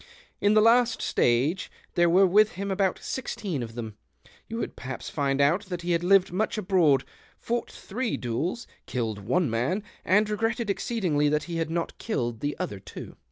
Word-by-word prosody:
In 205 +1 +3
the 215 - +7
last 240 +1 +4
stao;e 135 +10 +1
— - - -31
there 175 -1 +4
were 185 +3 +6
with 210 +4 +4
him 200 +2 -4
about 190 -1 +1
sixteen 195 - -4
of 115 -1 -6
them 110 -3 -6 0.2
— - - -27
you 225 - -4
would - - -4
perhaps 130 -1 -6
find 140 -2 0
out 165 +9 +3
that 180 -2 -5
he 175 - -1
had 170 0 +1
lived 190 0 +4
much 215 +4 0
abroad, 175 -9 +3 0.3
fought 235 +1 -2
three 235 +3 -3
duels, 145 - -2 0.2
killed 115 -5 -2
one 135 - +1
man, 125 - -1 0.2
and 210 +3 +3
regretted 225 +1 0
exceedingly 175 -10 0
that 150 0 +1
he 170 -1 -4
had 165 -1 -1
not 165 0 -3
killed 120 - -2
the 145 +4 -3
other 100 - -4
two. 95 - -10
175 Hz, 190 wpm, -27 LUFS, 135-210 Hz, 0.3 s, the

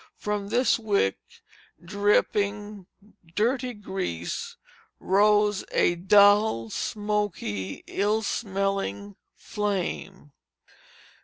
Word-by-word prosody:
From 210 -1 -3
this 250 +1 +2
wick, 200 - +1 0.6
dripping 205 +1 0 0.5
dirty 245 +3 0
grease, 190 - -5 0.4
rose 205 +1 +3
a - - +3
dull, 200 - +4
smoky, 205 - -3
ill 210 +3 0
smelling 195 - -2 0.2
flame. 195 -5 -4
205 Hz, 70 wpm, -26 LUFS, 185-210 Hz, 0.6 s, dull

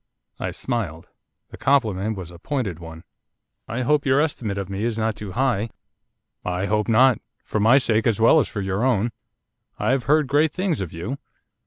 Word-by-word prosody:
I - - -2
smiled, 100 -11 -3 0.4
the - - -11
compliment 110 -6 +1
was 90 -2 -7
a 85 - -13
pointed 105 - -3
one. 80 0 -10 0.6
'I 120 +4 -3
hope 150 +3 +2
your 135 +1 +4
estimate 120 -10 -1
of 100 -2 -3
me 100 +2 -4
is 115 -1 -1
not 110 -1 0
too 105 -3 -7
high.' 115 -2 +1 0.7
'I 90 +1 -1
hope 105 +1 0
not, 125 +2 +5 0.2
for 110 - -2
my 115 +6 +6
sake, 115 -5 +2
as 115 -3 +1
well 115 +8 +6
as 135 - +1
for 105 - -5
your 95 +3 -1
own. 120 -3 +2 0.7
I - - +1
have 130 -3 0
heard 150 +3 +4
great 145 +3 +2
things 180 - -1
of 90 - -4
you. 105 +13 -5
110 Hz, 190 wpm, -23 LUFS, 100-130 Hz, 0.7 s, my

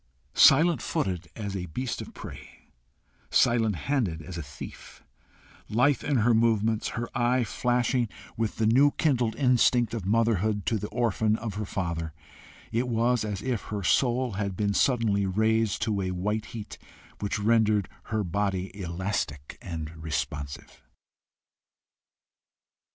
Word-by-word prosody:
Silent 170 +1 +6
footed 95 - -2
as 100 -3 -4
a 90 -2 -4
beast 125 +9 -3
of - - -8
prey, - - -11 0.6
silent 115 -4 +3
handed 110 - -1
as 85 +3 -8
a 85 - -4
thief, 70 - -10 0.7
lithe 125 +5 +2
in 145 - 0
her 120 +1 +4
movements, 110 -1 +2
her 120 0 -2
eye 125 0 +2
flashing 120 +1 0 0.3
with 115 -1 -1
the 110 - 0
new 130 +6 +5
kindled 125 -7 +1
instinct 125 -3 +3
of 115 -4 -3
motherhood 110 -1 +1
to 110 - +1
the 105 - -4
orphan 110 -2 +1
of 110 -2 -4
her 105 +1 -4
father, 85 -4 -3 0.6
it 120 +3 0
was 120 0 +1
as 105 -2 -4
if 125 -4 -2
her 105 -2 -4
soul 125 +4 +2
had 100 -2 -3
been 100 -1 +1
suddenly 110 -6 +2
raised 110 +2 +1
to 105 -3 0
a 95 - -1
white 105 +4 -2
heat, 110 -3 -8 0.4
which 100 - -2
rendered 105 -1 +3 0.2
her 110 -1 -1
body 95 0 -2
elastic 85 -6 -4
and 80 -2 -6
responsive. 70 -2 -4
110 Hz, 140 wpm, -27 LUFS, 95-120 Hz, 0.7 s, Silent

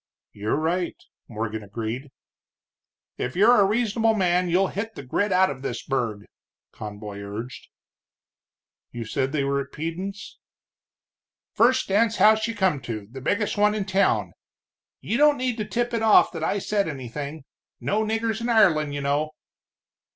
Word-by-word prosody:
"You're 105 +1 -2
right," 170 +4 -1 0.3
Morgan 110 -1 -4
agreed. 115 +6 -5 1.1
"If 125 - -3
you're 215 +4 +6
a - - +5
reasonable 225 +1 +1
man, 180 -2 +2
you'll 185 +3 +2
hit 225 +3 -5
the - - -7
grit 195 +10 -1
out 185 -1 +4
of 130 -2 -8
this 125 -3 -4
burg," 115 -6 -2 0.5
Conboy 105 -1 -8
urged. 105 +4 -7 1.2
"You 120 -1 -6
said 130 +4 -1
they 145 -2 0
were 140 0 0
at 135 0 -9
Peden's?" 180 +6 -6 1.1
"First 255 +3 +3
dance 220 +3 +2
house 215 0 +5
you 230 - -4
come 190 -9 +1
to, 115 -3 -5
the 135 +1 -8
biggest 205 - 0
one 210 0 +4
in 205 -2 -2
town. 195 0 +1 0.7
You 230 - -1
don't 295 0 +5
need 250 -2 -1
to 215 - -2
tip 240 +2 -2
it 230 - 0
off 220 -1 +5
that - - -5
I - - 0
said 200 0 0
anything. 140 +1 -6 0.4
No 215 +2 0
niggers 225 +1 -1
in 235 - -2
Ireland, 160 -10 +3
you 145 - -3
know." 145 +2 0
180 Hz, 160 wpm, -24 LUFS, 130-215 Hz, 1.2 s, you're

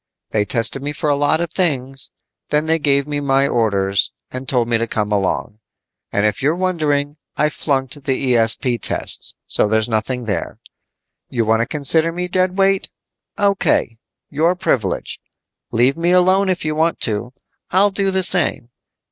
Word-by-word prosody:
They 105 -1 +1
tested 115 +4 0
me 145 +1 -3
for 150 0 -1
a - - +3
lot 145 +3 +1
of 170 -2 -3
things, 135 -7 -1 0.4
then 150 +1 +1
gave 140 -2 +2
me 145 -1 -2
my 140 -1 +2
orders 100 -6 +1 0.2
and 130 +1 -5
told 120 -3 +2
me 115 -1 +1
to 115 - -1
come 105 -2 -2
along. 105 +1 -1 0.5
And 100 +1 +1
if 105 +5 0
you're 145 +5 +2
wondering, 155 -5 -1 0.2
I 150 - +2
flunked 135 -4 -1
the 130 -1 0
ESP 120 +2 +1
tests, - - -1
so - - +1
there's 110 +1 +1
nothing 120 +2 -2
there. 100 -6 -3 0.7
You 120 -3 -1
want 110 +1 +2
to 115 - -1
consider 160 +3 +3
me 180 +1 -3
dead 185 +1 0
weight? 195 0 +2 0.5
O.K., 195 - +1 0.3
your 165 +5 +2
privilege. 110 - -2 0.5
Leave 125 +4 +3
me 170 +1 +1
alone 185 +2 +4
if 180 -3 -1
you 155 - 0
want 160 +2 0
to, 115 +3 -1 0.4
I'll 200 +3 +3
do 195 0 0
the 190 0 +1
same. 160 -9 0
140 Hz, 165 wpm, -19 LUFS, 115-170 Hz, 0.7 s, alone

